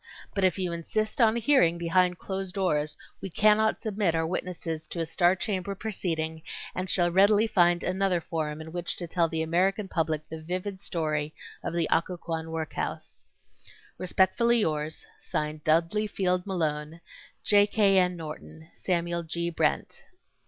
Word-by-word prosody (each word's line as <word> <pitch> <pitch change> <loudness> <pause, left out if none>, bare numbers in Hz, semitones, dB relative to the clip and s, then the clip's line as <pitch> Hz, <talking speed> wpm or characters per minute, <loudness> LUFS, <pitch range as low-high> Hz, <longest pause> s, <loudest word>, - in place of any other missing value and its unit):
But 195 - -1
if 185 +1 +3
you 180 -2 -1
insist 215 +8 -2
on 225 -1 +5
a - - 0
hearing 215 - +4
behind 180 +1 +2
closed 190 -1 -5
doors 150 -6 0 0.2
we 195 - -5
cannot 215 +4 +3
submit 200 -6 0
our 160 0 +1
witnesses 165 -2 -4
to 170 - -5
a 165 - 0
star 175 +2 +3
chamber 195 0 -2
proceeding 165 -6 -3 0.3
and 185 0 -3
shall 175 -2 +3
readily 205 +4 +5
find 175 -5 +3
another 185 -1 +1
forum 155 -2 -3
in 160 0 -9
which 175 0 -2
to 175 - -5
tell 165 0 +2
the 160 0 -1
American 190 +5 +1
public 160 -4 -1
the 160 0 -7
vivid 185 +4 -4
story 155 -4 -2 0.3
of - - -2
the 165 -2 +1
Occoquan 165 -1 -1
work 160 -1 -4
house. - - -5 0.8
Respectfully 220 +6 +3
yours, 155 -3 -2
(Signed) 150 0 -3
DUDLEY 170 +7 +2
FIELD 185 -2 -1
MALONE, 155 -3 -2 0.4
J. 205 -1 +5
K. 200 -3 +4
N. 180 -1 +2
NORTON, 160 0 -9
SAMUEL 170 -1 -1
G. 170 +1 -3
BRENT. 165 - -1
175 Hz, 160 wpm, -28 LUFS, 160-195 Hz, 0.8 s, on